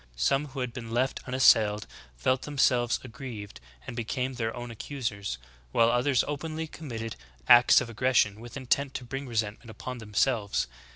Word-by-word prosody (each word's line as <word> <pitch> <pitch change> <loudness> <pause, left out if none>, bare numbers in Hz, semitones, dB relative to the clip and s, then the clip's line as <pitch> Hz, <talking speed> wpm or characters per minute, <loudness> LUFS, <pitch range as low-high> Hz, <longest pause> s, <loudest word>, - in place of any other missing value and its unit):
Some 135 - +1
who 135 -1 -6
had 125 -2 -3
been 115 -2 -7
left 125 +3 0
unassailed 110 -5 +4 0.3
felt 130 - +1
themselves 125 -4 +2
aggrieved, 120 -5 -8 0.3
and - - -6
became 125 +3 -2
their 115 -2 -2
own 120 -1 -6
accusers; 115 - -4 0.3
while 115 - +4
others 125 +2 +3
openly 155 +2 -3
committed 115 -8 -6 0.3
acts 120 +1 +8
of 125 - -4
aggression 115 -3 +2
with 120 +4 -9
intent 135 +1 0
to - - -4
bring 135 +3 -5
re 120 - -8
sentment 110 +1 -2
upon 125 +3 -7
themselves." 105 0 0
120 Hz, 160 wpm, -28 LUFS, 115-130 Hz, 0.3 s, acts